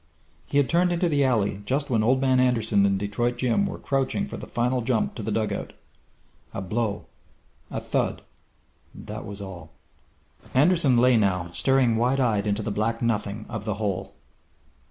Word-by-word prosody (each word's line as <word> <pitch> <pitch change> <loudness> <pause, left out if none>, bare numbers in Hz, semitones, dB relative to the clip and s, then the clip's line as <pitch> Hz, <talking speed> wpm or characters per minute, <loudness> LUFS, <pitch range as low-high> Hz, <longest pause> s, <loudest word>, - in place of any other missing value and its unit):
He - - -1
had 140 -2 +4
turned 175 +2 +2
into 175 +1 +1
the 145 -4 +2
alley 105 -6 +1
just 135 +6 -1
when 115 -3 +3
Old 130 +4 +3
Man 130 -1 +3
Anderson 115 -5 +3
and 100 -1 +1
Detroit 120 +5 -1
Jim 130 +11 +1
were - - -5
crouching 135 +8 -1
for - - -7
the - - -8
final 125 +1 0
jump 115 -2 0
to - - -7
the 105 - -3
dugout! 110 0 -2 0.8
A - - -2
blow 105 +1 -2 0.6
a - - -3
thud - - -2 0.7
that - - -8
was 100 0 -7
all.... 90 -4 -9 0.9
Anderson 145 -2 +4
lay 125 0 +5
now, 90 -5 0
staring 130 +2 +2
wide 125 +4 +2
eyed 110 -5 +1
into 105 +1 0
the 105 - -2
black 115 +3 -1
nothing 105 -2 -1
of 110 -2 -5
the 105 -2 -2
hole. 105 -3 -3
115 Hz, 175 wpm, -25 LUFS, 105-130 Hz, 0.9 s, lay